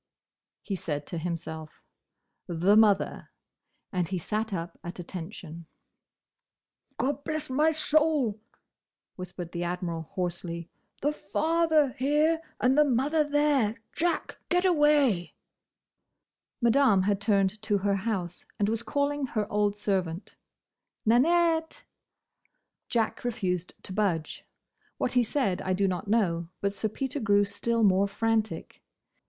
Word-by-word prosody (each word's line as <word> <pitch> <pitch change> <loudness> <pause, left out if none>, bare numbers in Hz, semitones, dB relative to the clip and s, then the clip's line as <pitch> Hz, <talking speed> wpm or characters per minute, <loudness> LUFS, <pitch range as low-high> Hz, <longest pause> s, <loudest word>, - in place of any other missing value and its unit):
he 200 - -3
said 150 -5 -4
to 170 - -5
himself, 160 -2 -6 0.6
"the 180 +3 +3
mother!" 215 -3 +3 0.6
and 180 -3 0
he 190 - -2
sat 215 +5 -2
up 170 -2 -5
at 175 - -7
attention. 170 -2 -8 1.3
"Gobblessmysoul!" 295 -2 +1 0.8
whispered 180 -2 -7
the 175 0 -3
Admiral, 175 -1 -3
hoarsely. 170 -2 -4 0.3
"The 295 - +3
father 315 -1 +2
here, 300 +6 +1 0.2
and 255 +1 +3
the 300 - +6
mother 290 +4 +2
there! 290 -7 +2 0.2
Jack! 340 +1 -1
Get 360 +1 +2
away!" 295 - +3 1.3
Madame 235 -5 +4
had 200 0 +1
turned 200 -1 +1
to 215 -2 +1
her 200 0 +1
house 190 -4 -3
and 205 0 +1
was 225 0 0
calling 285 +2 -1
her 215 -4 -1
old 205 0 +1
servant. 190 -4 -2 0.7
"Nanette!" 325 - +3 1.1
Jack 225 -2 0
refused 185 -8 -2
to 185 - -5
budge. 180 -7 -1 0.5
What 250 - -1
he 250 -1 +4
said 225 -6 0
I 185 - -1
do 195 +1 +2
not 185 +2 -3
know; 175 -6 +1
but 200 0 -1
Sir 210 +2 -2
Peter 265 +5 -3
grew 205 -3 +3
still 220 +3 0
more 195 0 +4
frantic. 220 -3 -1
210 Hz, 120 wpm, -28 LUFS, 185-280 Hz, 1.3 s, the